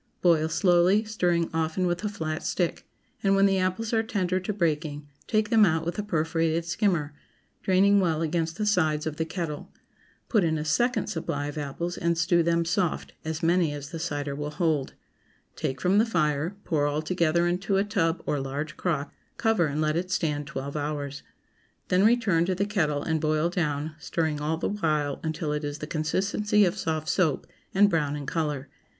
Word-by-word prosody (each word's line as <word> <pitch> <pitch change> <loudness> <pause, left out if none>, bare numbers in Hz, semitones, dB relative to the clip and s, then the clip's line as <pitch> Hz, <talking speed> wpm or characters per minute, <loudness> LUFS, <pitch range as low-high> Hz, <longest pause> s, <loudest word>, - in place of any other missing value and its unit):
Boil 160 -3 +4
slowly, 175 +4 +4
stirring 175 -6 +1
often 160 +3 0
with 175 +1 -1
a 210 - 0
flat 155 -5 -4
stick, 175 -3 -2 0.3
and 195 -1 +3
when 195 0 +5
the 195 -1 +3
apples 185 +5 -1
are 225 - +4
tender 190 -5 -1
to 185 +3 -3
breaking, 155 -6 -1 0.2
take 215 0 +1
them 225 -2 +6
out 160 -5 +2
with 170 +4 -3
a - - +2
perforated 165 -3 0
skimmer, 170 -5 0 0.5
draining 195 +2 +4
well 165 -4 +1
against 165 0 -1
the 215 - -1
sides 160 -7 +2
of 155 -1 -3
the 160 - 0
kettle. 165 -3 -5 0.6
Put 215 -5 +3
in 160 -1 +1
a 150 - -3
second 240 - +1
supply 160 -7 -3
of 145 - -8
apples 170 +5 -4
and 170 0 +1
stew 170 +1 +3
them 170 0 +1
soft, 175 0 -1
as 160 0 -4
many 170 -2 +3
as 145 0 -7
the 165 - -5
cider 145 -3 -3
will 145 +1 -4
hold. 150 -3 -1 0.6
Take 130 0 -3
from 190 +3 +3
the 220 - +4
fire, 155 -2 0
pour 145 -3 +1
all 150 +1 -1
together 170 0 +1
into 185 +3 0
a 195 - +3
tub 185 -5 0
or 145 - 0
large 145 +3 -4
crock; 155 -5 -2 0.2
cover 225 -8 +2
and 150 +1 -2
let 155 0 +1
it 180 +2 -2
stand 150 -6 -1
twelve 140 0 -5
hours. 145 -1 -3 0.7
Then 185 +1 +4
return 215 -7 +3
to 185 +1 0
the 200 +2 0
kettle 155 -9 0
and 160 -1 0
boil 155 +2 +1
down, 155 -3 -2
stirring 160 -1 -1
all 155 +2 0
the - - -1
while 155 -8 0
until 155 -1 -2
it 150 0 -2
is 145 0 -3
the 150 - -6
consistency 195 +7 +1
of 175 - 0
soft 155 -1 -2
soap, 160 -7 +1 0.3
and 205 +2 +5
brown 150 -6 0
in 145 -1 -5
color. 145 -3 -2
165 Hz, 190 wpm, -27 LUFS, 150-185 Hz, 0.7 s, them